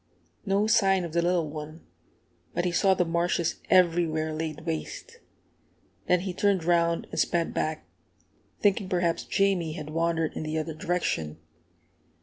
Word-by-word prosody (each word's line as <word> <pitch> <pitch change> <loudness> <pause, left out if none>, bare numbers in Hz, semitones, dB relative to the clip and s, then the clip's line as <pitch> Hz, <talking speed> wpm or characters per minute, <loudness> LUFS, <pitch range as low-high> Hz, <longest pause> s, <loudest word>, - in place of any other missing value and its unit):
No 200 +2 +2
sign 195 -4 +3
of 170 -2 -6
the 170 - +2
little 175 -2 +1
one; 155 +2 -8 0.7
but 175 - 0
he 180 - +1
saw 190 +2 +3
the 180 - +1
marshes 170 0 0
everywhere 165 -3 +3
laid 155 0 -4
waste. 465 - -5 0.9
Then 180 -1 +3
he 185 -1 -4
turned 195 -1 +1
round 170 0 +2
and - - -3
sped 170 -1 +1
back, 155 0 -2 0.7
thinking 200 -2 +1
perhaps 175 -3 0
Jamie 190 -5 +1
had 155 -2 -7
wandered 165 0 0
in - - -5
the 155 0 -3
other 155 +1 -3
direction. 155 - -2
170 Hz, 145 wpm, -27 LUFS, 160-185 Hz, 0.9 s, sign